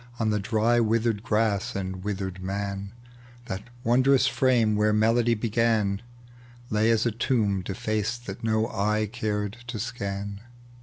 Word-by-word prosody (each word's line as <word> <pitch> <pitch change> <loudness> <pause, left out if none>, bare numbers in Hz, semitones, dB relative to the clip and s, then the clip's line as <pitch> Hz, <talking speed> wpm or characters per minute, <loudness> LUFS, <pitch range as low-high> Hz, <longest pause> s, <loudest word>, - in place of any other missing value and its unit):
On 110 -2 +1
the 105 - +1
dry 110 +3 +2
withered 115 -1 +1
grass 105 -2 0
and 95 -1 -4
withered 95 -2 -4
man: 100 +1 -3 0.5
That 95 -3 -5 0.2
wondrous 130 +3 +4
frame 125 -5 +3
where 105 0 +3
melody 115 +2 +3
began 110 -2 +1 0.7
Lay 110 +1 +3
as 115 0 +3
a 120 - +2
tomb 110 -4 +1
defaced 110 +4 -2
that 100 0 -7
no 110 0 +2
eye 105 +1 0
cared 105 -2 -2
to 115 -1 -4
scan. 100 -2 -4
110 Hz, 140 wpm, -26 LUFS, 100-115 Hz, 0.7 s, wondrous